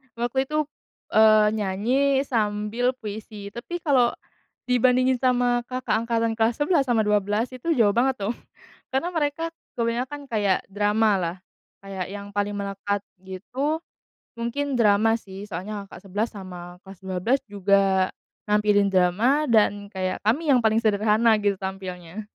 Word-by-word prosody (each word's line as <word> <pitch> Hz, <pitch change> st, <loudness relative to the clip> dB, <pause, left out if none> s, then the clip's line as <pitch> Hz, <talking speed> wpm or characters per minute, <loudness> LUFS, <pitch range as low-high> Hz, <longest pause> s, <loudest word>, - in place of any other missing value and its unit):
Waktu 245 Hz, +3 st, -1 dB
itu, 305 Hz, -, -2 dB, 0.5 s
eee, 215 Hz, -1 st, +6 dB
nyanyi 245 Hz, +8 st, +1 dB
sambil 215 Hz, +1 st, 0 dB
puisi, 210 Hz, -3 st, -8 dB
tapi 270 Hz, +11 st, -6 dB
kalau 255 Hz, -6 st, +3 dB, 0.6 s
dibandingin 255 Hz, +1 st, +3 dB
sama 245 Hz, -1 st, +2 dB
kakak 255 Hz, -2 st, -2 dB
angkatan 230 Hz, -1 st, 0 dB
kelas 225 Hz, +1 st, +1 dB
11 290 Hz, 0 st, +2 dB
sama 225 Hz, -3 st, +2 dB
12 210 Hz, +3 st, +1 dB
itu 255 Hz, +6 st, -5 dB
jauh 210 Hz, -4 st, +4 dB
banget, 255 Hz, +3 st, +2 dB
tuh, 235 Hz, -, -1 dB, 0.6 s
karena 270 Hz, +6 st, 0 dB
mereka 325 Hz, 0 st, -1 dB, 0.3 s
kebanyakan 250 Hz, +5 st, -2 dB
kayak 205 Hz, -4 st, +1 dB
dramalah. 205 Hz, -3 st, +1 dB, 0.4 s
Kayak 195 Hz, -2 st, -5 dB
yang 200 Hz, 0 st, -7 dB
paling 205 Hz, 0 st, -1 dB
melekat, 200 Hz, 0 st, -2 dB, 0.2 s
gitu, 250 Hz, -, -3 dB, 0.6 s
mungkin 270 Hz, +5 st, -2 dB
drama, 220 Hz, 0 st, +4 dB
sih. 195 Hz, -2 st, -10 dB
Soalnya, 200 Hz, +3 st, -5 dB
kakak 185 Hz, -, -12 dB
11 210 Hz, +5 st, -1 dB
sama 180 Hz, -3 st, -9 dB
kelas 190 Hz, -1 st, -12 dB
12 190 Hz, +8 st, +1 dB
juga 195 Hz, -1 st, +2 dB, 0.4 s
nampilin 210 Hz, -1 st, +3 dB
drama, 210 Hz, +11 st, +3 dB
dan, 205 Hz, -2 st, +2 dB
kayak 185 Hz, -1 st, -3 dB
kami 290 Hz, +9 st, +1 dB
yang 250 Hz, -, +5 dB
paling 220 Hz, 0 st, +3 dB
sederhana, 215 Hz, +1 st, +3 dB
gitu, 200 Hz, -1 st, +1 dB
tampilnya, 190 Hz, 0 st, -6 dB
215 Hz, 135 wpm, -24 LUFS, 200-245 Hz, 0.6 s, eee